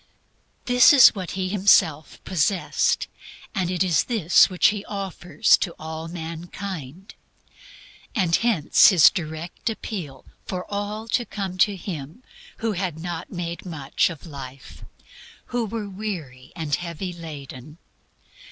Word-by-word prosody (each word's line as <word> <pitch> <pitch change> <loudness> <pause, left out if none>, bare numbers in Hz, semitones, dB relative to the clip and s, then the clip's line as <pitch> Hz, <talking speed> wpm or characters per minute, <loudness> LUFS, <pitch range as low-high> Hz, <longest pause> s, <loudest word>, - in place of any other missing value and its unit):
This 250 +6 +6
is 260 -3 +9
what 190 -2 -6
He 185 -1 -1
Himself 185 -6 +3
possessed, 185 +1 0 0.5
and 185 -4 -1
it 180 0 +1
was 175 -4 +2
this 205 -9 +4
which 180 -2 +4
He 210 -1 -4
offers 195 +1 +1
to 175 - -3 0.4
mankind. 170 0 -7 1.0
And 180 -6 +2
hence 220 -11 +4
His 180 -7 +7
direct 160 +2 -5
appeal 180 - -6 0.2
for 180 -1 -4
all 210 +2 -4
to 240 - +1
come 195 -4 -5
to 205 +1 +4
Him 165 - -7 0.3
who 225 -1 -1
had 180 -5 -3
not 170 0 -6
made 170 -1 -5
much 150 -7 -1
of 165 -2 -9
life, 135 -4 -10 0.7
who 240 -2 0
were 215 0 -4
weary 170 -10 -6
and 160 -3 -4
heavy 175 +2 -3
laden. 150 -3 -10
180 Hz, 125 wpm, -23 LUFS, 160-200 Hz, 1.0 s, is